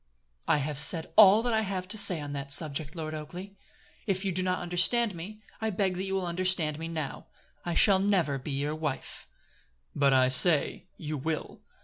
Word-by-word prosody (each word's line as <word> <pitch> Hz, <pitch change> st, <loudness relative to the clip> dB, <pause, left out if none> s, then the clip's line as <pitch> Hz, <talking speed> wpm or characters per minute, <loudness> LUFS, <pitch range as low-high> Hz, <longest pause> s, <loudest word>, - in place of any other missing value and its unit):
"I -, -, +3 dB
have 145 Hz, 0 st, -3 dB
said 160 Hz, +2 st, +1 dB
all 215 Hz, +1 st, +7 dB
that 240 Hz, -1 st, -1 dB
I 220 Hz, -, +2 dB
have 190 Hz, -3 st, -4 dB
to 215 Hz, -, +2 dB
say 200 Hz, -5 st, +2 dB
on 145 Hz, -1 st, -7 dB
that 140 Hz, -1 st, -6 dB
subject, 150 Hz, +1 st, -2 dB
Lord 155 Hz, -2 st, -5 dB
Oakleigh. 175 Hz, +6 st, -8 dB, 0.6 s
If 195 Hz, -1 st, -1 dB
you 195 Hz, -, 0 dB
did 185 Hz, +1 st, -1 dB
not 185 Hz, 0 st, 0 dB
understand 185 Hz, +6 st, +1 dB
me, 190 Hz, +6 st, -9 dB, 0.2 s
I 220 Hz, -, -1 dB
beg 195 Hz, -2 st, -1 dB
that 190 Hz, -, -3 dB
you 195 Hz, 0 st, -3 dB
will 190 Hz, -1 st, -2 dB
understand 175 Hz, -3 st, 0 dB
me 165 Hz, -, -5 dB
now. 155 Hz, -4 st, -6 dB, 0.4 s
I 175 Hz, -1 st, -3 dB
shall 195 Hz, -3 st, +5 dB
never 185 Hz, -8 st, 0 dB
be 130 Hz, -, -9 dB
your 145 Hz, +2 st, -2 dB
wife." 155 Hz, -3 st, -6 dB, 0.7 s
"But 140 Hz, -1 st, +2 dB
I 130 Hz, -1 st, +4 dB
say, 145 Hz, +3 st, +4 dB
you 155 Hz, -1 st, -5 dB
will." 155 Hz, +3 st, -5 dB
170 Hz, 200 wpm, -28 LUFS, 150-190 Hz, 0.7 s, all